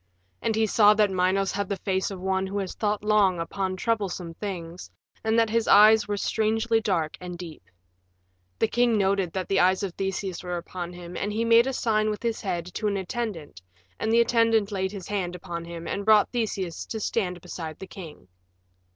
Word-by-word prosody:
And 225 - 0
he 220 0 +3
saw 210 0 +5
that 210 -2 +3
Minos 190 +1 +1
had 200 0 -3
the 200 - -1
face 190 -1 -1
of 195 -2 -7
one 190 +1 -1
who 200 +1 -4
has 195 -2 -3
thought 210 -1 -1
long 205 -4 +3
upon 185 +3 -2
troublesome 190 -5 -2
things, 175 -3 -6 0.3
and 220 +1 +1
that 225 -1 +3
his 230 0 +1
eyes 215 0 +7
were 205 0 -1
strangely 225 +2 +1
dark 170 -7 -1
and 180 -1 -6
deep. 170 -3 -9 1.0
The 225 - +2
king 240 -1 +2
noted 195 -3 +1
that 185 -1 -3
the 195 - +2
eyes 185 +2 +3
of 190 -3 -3
Theseus 190 -1 -3
were 180 -1 -3
upon 175 0 -6
him, 175 0 -9
and 205 - -2
he 225 +2 -1
made 230 +2 +5
a - - 0
sign 215 -3 +1
with 210 +1 -4
his 230 -1 -1
head 175 -4 -2
to 215 - -2
an 200 -1 0
attendant 190 - -5 0.4
and 220 - 0
the 230 +1 +5
attendant 230 -3 +2
laid 190 -1 -1
his 195 -4 -8
hand 185 -4 -2
upon 170 -1 -6
him 170 0 -7
and 200 - -3
brought 215 0 +5
Theseus 200 -8 -3
to 220 - -4
stand 185 -4 -1
beside 160 -2 -7
the 190 - -8
king. 170 - -11
195 Hz, 205 wpm, -26 LUFS, 180-220 Hz, 1.0 s, eyes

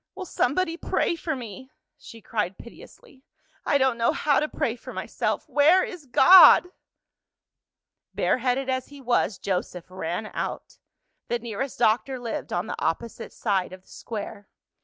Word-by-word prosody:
"Will 380 -1 -6
somebody 330 +3 -1
pray 345 - -1
for 325 -2 -3
me?" 255 +1 -9 0.3
she 230 - -14
cried 205 -4 -3
piteously. 270 - -15 0.4
"I 285 - +3
don't 260 -3 +1
know 230 - +2
how 290 -2 +2
to 305 - -1
pray 230 - -2
for 240 - -11
myself. - - -3
Where 300 +6 +4
is 330 -6 -8
God?" 355 +7 +8 1.5
Bareheaded 255 +1 0
as 260 -1 -2
he 285 -1 -13
was, 240 -5 0
Joseph 180 -2 -3
ran 185 +3 -4
out. - - -5 0.5
The 240 - -1
nearest 235 +3 -5
doctor 245 +3 +1
lived 240 -2 -5
on 175 +2 -1
the - - -6
opposite 215 +8 -3
side 190 -4 -2
of 185 0 -12
the - - -27
Square. 205 -2 -8
245 Hz, 150 wpm, -25 LUFS, 215-285 Hz, 1.5 s, God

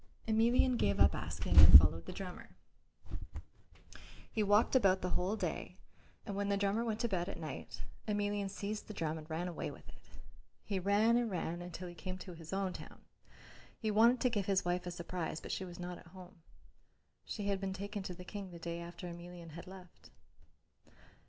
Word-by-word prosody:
Emelian 235 +3 +3
gave 100 - +1
up - - +6
asking - - -3
and - - +13
followed 80 +2 +3
the - - -4
drummer. - - -7 1.8
He 220 - 0
walked 210 +5 +4
about 195 -7 +4
the 180 - -1
whole 185 +4 0
day - - -4 0.5
and 200 - -4
when 200 0 -1
the 200 - +2
drummer 200 +3 +1
went 225 -2 -2
to 235 - +1
bed 180 -5 -1
at - - -6
night, 155 -2 -7 0.2
Emelian 205 -1 0
seized 205 +2 -5
the 215 - -8
drum 160 -1 -2
and 155 +1 -12
ran 165 +3 -2
away 175 - -4
with - - -12
it. - - -17 0.5
He 195 -2 -2
ran 205 +5 +4
and 240 -2 +1
ran 175 -2 -3
until 180 +1 -7
he 175 - -8
came 185 +2 -6
to 185 0 -9
his 165 -1 -10
own 195 -1 -1
town. - - -11 0.7
He 220 -2 -1
wanted 230 +4 +5
to 250 - +3
give 205 -4 -1
his 195 -2 +2
wife 180 0 -1
a - - -1
surprise, 170 -2 -4
but - - -7
she 190 - -2
was 175 -1 -9
not 180 0 -5
at - - -16
home. 180 0 -13 0.8
She 205 - -5
had 195 -1 0
been 195 -1 -2
taken 200 +2 -5
to 185 -1 -6
the 180 - -10
King 200 0 -6
the 175 - -9
day 170 0 -5
after 170 +1 -8
Emelian 175 -1 -9
had 170 +3 -9
left. 180 - -13
185 Hz, 195 wpm, -35 LUFS, 175-205 Hz, 1.8 s, and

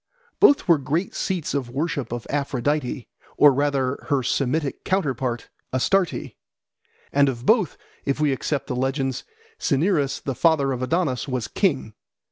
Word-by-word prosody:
Both 285 -9 +5
were 170 -4 +5
great 155 +7 -1
seats 175 -5 -2
of 140 -3 -1
the 120 - -13
worship 145 -4 -2
of 120 -1 -4
Aphrodite, 140 -1 -1 0.3
or 145 -2 +7
rather 140 -2 +1
of - - -12
her 140 -3 +1
Semitic 140 +3 -1
counterpart, 130 -10 -1 0.2
Astarte; 180 +8 0 0.8
and 140 0 +4
of 120 -1 -5
both, 220 -4 +3 0.3
if 140 +1 -1
we 150 -2 +2
accept 140 +1 -2
the 125 - -3
legends, 135 0 -1 0.4
Cinyras, 145 -1 +1
the 135 - -3
father 145 -1 +3
of 130 -1 -3
Adonis, 145 -2 0
was 125 -4 -2
king. 135 - 0
140 Hz, 150 wpm, -23 LUFS, 130-160 Hz, 0.8 s, or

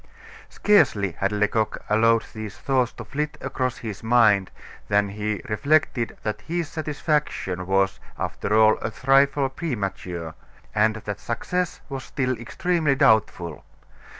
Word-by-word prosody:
Scarcely 130 - +3
had 100 +4 -1
Lecoq 105 +1 0
allowed 115 +1 +4
these 110 -2 -7
thoughts 130 -3 +1
to 120 - -9
flit 150 +6 -3
across 130 -1 -2
his 110 -4 -6
mind 110 -5 +4 0.4
than 100 -1 +2
he 105 +1 -3
reflected 135 0 +1
that 105 -1 -3
his 170 0 -2
satisfaction 150 - -2
was, 95 0 +1 0.2
after 105 - -2
all, 110 0 +5
a - - -2
trifle 135 +3 +3
premature, 95 - -4 0.4
and 110 +1 +3
that 105 -2 -5
success 180 +9 -2
was 135 -2 -5
still 130 -1 -1
extremely 155 +4 0
doubtful. 110 - +2
115 Hz, 125 wpm, -24 LUFS, 105-140 Hz, 0.4 s, all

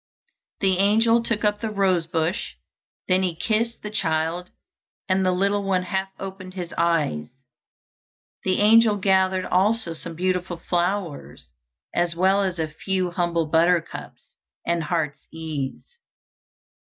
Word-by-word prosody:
The 190 -2 +2
angel 225 +4 +4
took 230 -2 -1
up 210 0 +1
the 225 - -2
rose 190 -5 +1
bush; 165 +3 -2 0.5
then 185 0 +3
he 180 -3 -1
kissed 225 +6 -1
the 210 - -5
child, 165 -1 -1 0.6
and 190 0 +2
the 185 - +3
little 200 +3 +1
one 190 -2 +1
half 190 +1 -2
opened 190 -1 -8
his 175 -3 -5
eyes. 155 - +1 1.2
The 185 +1 +1
angel 220 0 +6
gathered 190 -1 +2
also 195 -1 +1
some 165 +1 -7
beautiful 180 0 -1
flowers, 175 - -2 0.4
as 175 -1 0
well 190 +3 +3
as 185 -3 -1
a 160 -1 -1
few 185 +3 -2
humble 170 -2 0
buttercups 165 +2 0 0.4
and 170 -2 0
heart's 150 -3 -2
ease. 160 - -6
185 Hz, 130 wpm, -24 LUFS, 170-195 Hz, 1.2 s, angel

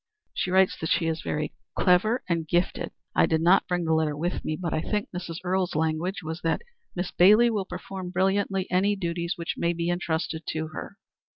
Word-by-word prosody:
"She - - -1
writes 190 0 +4
that 160 - -3
she 170 - +2
is 160 -1 -1
very 150 0 -2 0.2
clever 205 +7 +3
and 165 -3 -1
gifted. 175 +4 0 0.2
I - - +4
did 160 - +2
not 175 +4 +4
bring 180 -1 0
the 160 - +2
letter 155 -2 +1
with 175 +4 -2
me, 155 - -2
but 170 -3 -2
I 155 - 0
think 210 +4 -1
Mrs. 170 -2 -5
Earle's 185 -1 0
language 160 +4 -1
was 160 +2 -5
that 165 - 0 0.3
Miss 180 0 -2
Bailey 215 +6 +6
will 205 -3 -1
perform 185 0 -6
brilliantly 190 +1 +1
any 195 +3 +3
duties 170 -1 -2
which 170 -3 -4
may 170 0 +1
be 170 0 -2
intrusted 165 -2 -2
to 155 0 -2
her." 200 +5 -8
175 Hz, 200 wpm, -26 LUFS, 160-190 Hz, 0.3 s, Bailey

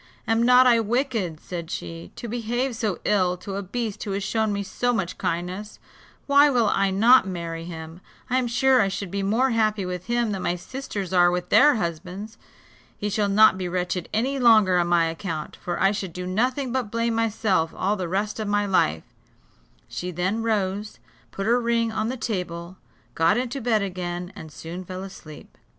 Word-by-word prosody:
"Am 225 0 +2
not 250 +2 +6
I 240 -2 +5
wicked," 225 - -1
said 170 -2 -7
she, 165 0 -6
"to 235 - -7
behave 240 +2 -2
so 215 -6 -1
ill 185 -3 +2
to 195 +2 -7
a 200 - -2
beast 215 +2 -4
who 200 - -3
has 200 0 -2
shown 220 +2 0
me 200 0 -2
so 245 +5 -1
much 190 -6 -3
kindness; 180 +5 -3 0.5
why 285 +1 +6
will 240 -6 +2
I 195 0 +2
not 220 +3 +5
marry 165 -2 -5
him? 165 0 -8 0.3
I 255 0 +2
am 250 - -1
sure 255 +1 +4
I 200 - +2
should 195 -1 -4
be 200 0 -2
more 230 +7 +2
happy 215 -3 +1
with 180 0 -5
him 240 -2 +1
than 195 -2 -3
my 175 - 0
sisters 200 -2 -6
are 175 -1 +6
with 180 0 -2
their 295 0 +6
husbands. 185 +4 -5 0.6
He 205 0 -3
shall 205 -1 +1
not 205 -1 +5
be 180 -1 -3
wretched 180 0 -2
any 265 +5 0
longer 215 -7 +5
on 175 - +1
my 175 -1 +3
account; 165 -1 -4
for 175 -1 -4
I 195 - +4
should 195 -4 -4
do 180 +1 -5
nothing 250 +7 0
but 250 -4 -1
blame 230 +1 0
myself 215 -7 +1
all 200 +3 +1
the 185 -4 -3
rest 205 +4 -2
of 215 - -3
my 205 0 +1
life," 80 - +1 0.8
She 180 - -5
then 180 +6 -1
rose, 210 -2 -1 0.3
put 195 - -5
her 240 +2 +3
ring 230 -1 +1
on 220 0 -1
the 260 - -3
table, 180 -5 -4 0.4
got 165 +6 +3
into 255 +2 -2
bed 220 -3 +2
again, 180 -1 -4
and 160 - -10
soon 170 +5 -7
fell 185 +1 -7
asleep. 160 -6 -11
200 Hz, 195 wpm, -24 LUFS, 180-230 Hz, 0.8 s, not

